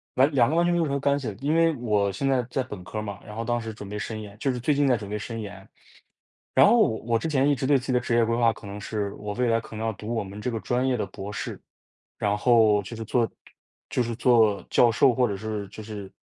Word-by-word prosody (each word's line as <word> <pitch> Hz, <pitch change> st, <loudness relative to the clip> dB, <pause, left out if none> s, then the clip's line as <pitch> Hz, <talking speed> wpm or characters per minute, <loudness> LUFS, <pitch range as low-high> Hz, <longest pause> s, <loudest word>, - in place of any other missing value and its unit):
完 130 Hz, +3 st, +5 dB
2 125 Hz, -1 st, +4 dB
个 155 Hz, -, 0 dB
完 170 Hz, +1 st, +3 dB
全 175 Hz, -, +2 dB
没 -, -, +2 dB
有 -, -, +3 dB
什 140 Hz, -, -3 dB
么 140 Hz, -, 0 dB
干 140 Hz, +1 st, +2 dB
系 130 Hz, -, -5 dB
的， 105 Hz, -, -3 dB
因 150 Hz, +3 st, +1 dB
为 165 Hz, -1 st, +4 dB
我 105 Hz, -4 st, +1 dB
现 100 Hz, +9 st, -2 dB
在 130 Hz, -2 st, +2 dB
在 135 Hz, -, 0 dB
本 105 Hz, -7 st, -9 dB
科 100 Hz, -, -7 dB
儿 -, -, -2 dB
嘛， 100 Hz, -2 st, -6 dB
然 105 Hz, -, -9 dB
后 115 Hz, -, -3 dB
当 120 Hz, 0 st, 0 dB
时 115 Hz, -1 st, -6 dB
准 105 Hz, -2 st, -9 dB
备 105 Hz, -, -5 dB
申 110 Hz, +1 st, -5 dB
研， 105 Hz, 0 st, -11 dB
就 135 Hz, -, +1 dB
是 125 Hz, -, -4 dB
最 135 Hz, +5 st, +1 dB
近 145 Hz, 0 st, +2 dB
在 125 Hz, -, +3 dB
准 100 Hz, -2 st, -8 dB
备 105 Hz, -, -2 dB
申 115 Hz, +2 st, -6 dB
研， 100 Hz, -2 st, -9 dB, 0.9 s
然 -, -, +7 dB
后 235 Hz, +3 st, +5 dB
我 115 Hz, -, +1 dB
之 115 Hz, -, -4 dB
前 140 Hz, -2 st, +2 dB
一 145 Hz, -, +4 dB
直 130 Hz, 0 st, -2 dB
对 145 Hz, +1 st, +5 dB
自 130 Hz, -, -8 dB
己 130 Hz, -, -1 dB
的 125 Hz, -, +4 dB
职 120 Hz, -1 st, -1 dB
业 115 Hz, 0 st, +4 dB
规 115 Hz, +1 st, 0 dB
划， 115 Hz, -1 st, +3 dB
可 -, -, -15 dB
能 100 Hz, +1 st, -7 dB
是 100 Hz, -1 st, -3 dB
我 105 Hz, 0 st, -6 dB
未 125 Hz, +1 st, 0 dB
来 115 Hz, 0 st, +3 dB
可 110 Hz, -, -12 dB
能 110 Hz, -, -4 dB
要 110 Hz, -, 0 dB
读 110 Hz, +4 st, -5 dB
我 115 Hz, -, 0 dB
们 100 Hz, +2 st, -9 dB
这 125 Hz, -, -2 dB
个 115 Hz, -, -3 dB
专 125 Hz, +1 st, 0 dB
业 130 Hz, -1 st, +1 dB
的 110 Hz, -, -1 dB
博 100 Hz, +1 st, -8 dB
士。 -, -, -5 dB, 0.6 s
然 105 Hz, 0 st, 0 dB
后 110 Hz, -2 st, +4 dB
就 110 Hz, +5 st, -8 dB
是 115 Hz, -, -5 dB
做 115 Hz, +1 st, +1 dB, 0.6 s
就 -, -, 0 dB
是 120 Hz, -1 st, -2 dB
做 115 Hz, -4 st, +3 dB
教 120 Hz, -, +5 dB
授， 120 Hz, +2 st, +4 dB
或 125 Hz, +1 st, +2 dB
者 100 Hz, -, -3 dB
是 105 Hz, 0 st, -4 dB
就 110 Hz, -, -9 dB
是 105 Hz, -3 st, -7 dB
115 Hz, 320 characters per minute, -25 LUFS, 105-125 Hz, 0.9 s, 然